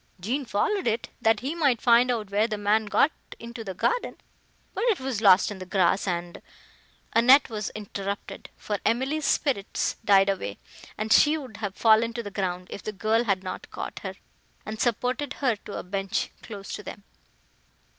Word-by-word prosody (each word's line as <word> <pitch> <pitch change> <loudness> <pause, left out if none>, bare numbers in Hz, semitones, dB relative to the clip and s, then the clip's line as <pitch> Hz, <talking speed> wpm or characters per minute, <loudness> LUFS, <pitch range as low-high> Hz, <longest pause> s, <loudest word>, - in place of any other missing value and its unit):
Jean 250 +10 -2
followed 245 - 0
it, 225 +1 -1
that 225 -2 +3
he 270 +5 -2
might 285 -8 +2
find 240 +1 +5
out 220 -5 -2
where 210 +2 +2
the 215 -2 -3
man 210 +1 +1
got 280 +9 +3 0.3
into 235 0 -8
the 190 -3 -6
garden, 485 - 0 0.6
but - - -2
it 455 -6 +2
was 260 -5 -3
lost 195 0 +6
in 200 - -7
the - - -6
grass, 190 +1 +2
and—" 175 -1 -3 0.7
Annette 255 +3 +6
was 210 -2 -3
interrupted: 200 -1 -6
for 205 -2 -3
Emily's 265 +7 0
spirits 250 -11 0
died 195 -2 +5
away, 100 - -2 0.4
and 215 +1 +1
she 305 +1 +5
would 255 -9 -9
have 205 -3 -4
fallen 225 +1 +4
to 235 0 -4
the 205 - -7
ground, 180 -2 -2
if - - -6
the 215 - -4
girl 220 +4 +1
had 195 -3 0
not 185 - -6
caught - - -6
her, - - -6 0.5
and 215 0 -5
supported 250 +4 0
her 255 -5 0
to 205 0 -8
a - - -5
bench, 195 +1 -2
close 200 -4 -8
to - - -5
them. 205 - -9
215 Hz, 185 wpm, -26 LUFS, 200-245 Hz, 0.7 s, lost